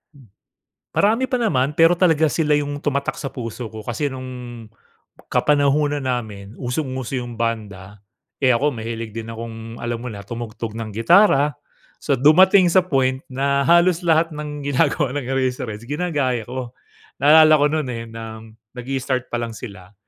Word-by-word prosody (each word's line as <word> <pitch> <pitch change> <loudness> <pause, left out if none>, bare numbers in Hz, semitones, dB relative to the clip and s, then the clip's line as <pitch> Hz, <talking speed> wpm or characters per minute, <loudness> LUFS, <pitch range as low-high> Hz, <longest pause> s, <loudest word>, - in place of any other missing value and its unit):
M 130 -7 -18 0.6
marami 225 +6 +2
pa 255 -1 -1
naman. 140 - +1
Pero 165 +2 +4
talagang 160 -4 +3
sila 150 -2 +1
'yong 145 0 -2
tumatak 140 -1 -2
sa 135 - -4
puso 115 -1 -6
ko 110 0 -9
kasi 120 +6 -2
no'ng 125 -3 -8 0.6
kapanahunan 145 -1 +2
namin 110 -5 -4
usong-uso 130 0 -3
yung 120 -2 -8
banda. 105 -4 -4 0.4
Eh, 130 - +4
ako, 140 +4 +1
mahilig 115 -1 -5
din 115 0 -6
akong 115 0 -8
alam 120 -1 -3
mo 125 - -4
na, 100 - -8
tumugtog 115 0 -6
ng 115 -1 -5
gitara. 150 - +4 0.5
So, 140 -3 +1
dumating 185 +6 +6
sa 185 +1 +4
point 130 -5 0
na 140 +1 +1
halos 170 +3 +4
lahat 165 -1 +2
ng 150 -1 -6
ginagawa 140 -1 +1
ng 145 - -2
Eraseheads, 125 -4 -2
ginagaya 145 -7 -1
ko. 125 +1 -6 0.5
Naalala 155 +2 +7
ko - - +5
no'n, 155 -4 -1
eh, 115 - -5
ng 110 -1 -8 0.4
nag-i-start 130 0 -3
pa 120 - -1
lang 115 -1 -4
sila, 100 -5 -10
130 Hz, 155 wpm, -21 LUFS, 115-150 Hz, 0.6 s, Naalala